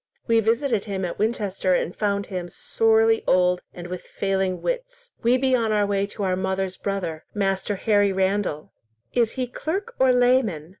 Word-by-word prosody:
We 230 0 +3
visited 225 0 +1
him 195 -3 -3
at 175 - -5
Winchester, 205 -4 0
and 175 - -2
found 200 -1 0
him 180 -3 -5
sorely 225 +2 +2
old 180 0 +3
and 175 - -9
with 180 0 -5
failing 190 -2 -2
wits. - - -4
We 240 +2 +4
be 260 0 +2
on 225 -3 +1
our 210 -1 +2
way 200 0 0
to 205 0 -6
our 185 -1 +1
mother's 190 0 -2
brother, 180 -6 -3
Master 195 0 0
Harry 205 0 +2
Randall." 190 -5 -1 0.4
"Is 235 -2 +2
he 255 -2 -2
clerk 320 - -4
or 260 0 +5
layman? 245 - +2
205 Hz, 170 wpm, -24 LUFS, 190-235 Hz, 0.4 s, or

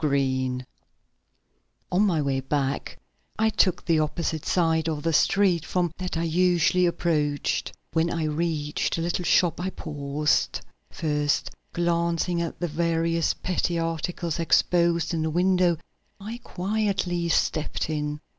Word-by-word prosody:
BESS 130 -3 0 1.3
On 180 - +3
my 175 -8 +2
way 135 -1 0
back 135 0 -2 0.4
I 220 0 +2
took 180 -4 +2
the 165 -2 +3
opposite 155 0 -2
side 165 -2 +2
of 150 -2 -3
the 165 - +1
street 180 +1 +3
from 175 -2 0
that 180 -2 -3
I 165 - 0
usually 180 +1 +3
approached. 150 -4 0 0.2
When 165 +1 +2
I 165 -1 -2
reached 155 -1 -1
the 165 - -2
little 175 +1 -1
shop 175 0 +3
I 185 +2 -1
paused. 150 -2 -1 0.3
First 150 -2 -1 0.2
glancing 170 0 0
at 170 - -4
the 175 - -1
various 165 +1 0
petty 175 -1 -1
articles 165 0 -2
exposed 170 0 +2
in 165 - 0
the 160 - 0
window, 180 0 +3 0.4
I 220 +4 -6
quietly 190 -3 -1
stepped 155 -1 0
in. 150 -1 -3
165 Hz, 135 wpm, -25 LUFS, 150-175 Hz, 1.3 s, On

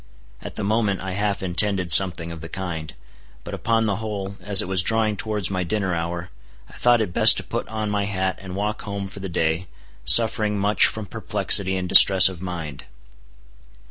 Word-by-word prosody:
At - - -10
the 105 - -5
moment 105 -1 -2
I 95 0 -6
half 100 0 -3
intended 90 0 -1
something 85 -1 +4
of 80 -2 -10
the 80 - -10
kind. 85 -5 -7 0.5
But - - -10
upon 115 0 -1
the 100 -3 -2
whole, 100 -3 -7
as 100 +1 +5
it - - +3
was 95 -1 +1
drawing 110 +2 -1
towards 105 -3 -4
my 95 -1 -3
dinner 95 0 -3
hour, 85 +1 -6 0.4
I - - -20
thought 120 -2 +1
it 90 - -8
best - - +5
to - - -4
put - - -6
on 110 -1 -5
my 100 -1 -2
hat 95 -2 -4
and 95 -1 -9
walk 105 +2 -4
home 100 -1 -7
for 95 +1 -12
the 95 0 -7
day, 80 +1 -3 0.4
suffering 110 -2 +4
much 100 +1 +1
from 110 -1 -7
perplexity 95 0 +1
and 90 0 -5
distress 95 +1 +8
of 90 -2 -11
mind. 85 -6 -8
95 Hz, 195 wpm, -21 LUFS, 90-105 Hz, 0.5 s, distress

